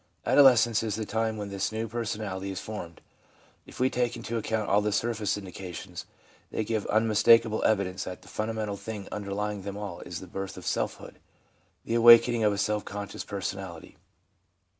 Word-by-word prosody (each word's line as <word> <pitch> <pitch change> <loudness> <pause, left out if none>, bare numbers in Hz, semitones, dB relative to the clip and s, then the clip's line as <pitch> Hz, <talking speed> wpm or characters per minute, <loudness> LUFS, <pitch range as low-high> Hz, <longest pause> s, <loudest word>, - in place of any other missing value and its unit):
Adolescence 120 -5 +6
is 110 -3 -2
the 110 - -3
time 110 +1 -1
when 105 -1 -5
this 100 +1 -2
new 110 +1 -3
personality 105 -4 -4
is 95 - -4
formed. 90 -6 -7 0.7
If - - -12
we 130 - +4
take 125 -1 0
into 115 - -5
account 110 -1 -1
all 100 +1 +3
the 105 0 0
surface 110 -1 0
indica 95 -2 -8
tions, - - -8 0.4
they 110 - -2
give 110 -1 -2
unmistakable 110 +1 +4
evidence 95 -3 +1
that 90 -1 -7
the - - -17
funda 110 +1 -3
mental 105 -2 -3
thing 105 -1 -7
underlying 105 0 -3
them 100 +1 -6
all 100 -4 -6
is 85 -2 -6
the - - -9
birth 95 +2 -6
of - - -9
selfhood, - - -3 0.7
the - - -2
awakening 120 0 +7
of 105 - +4
a 100 - -2
self 105 +1 0
conscious 100 0 -6
personality. 95 -4 -6
105 Hz, 180 wpm, -28 LUFS, 100-115 Hz, 0.7 s, awakening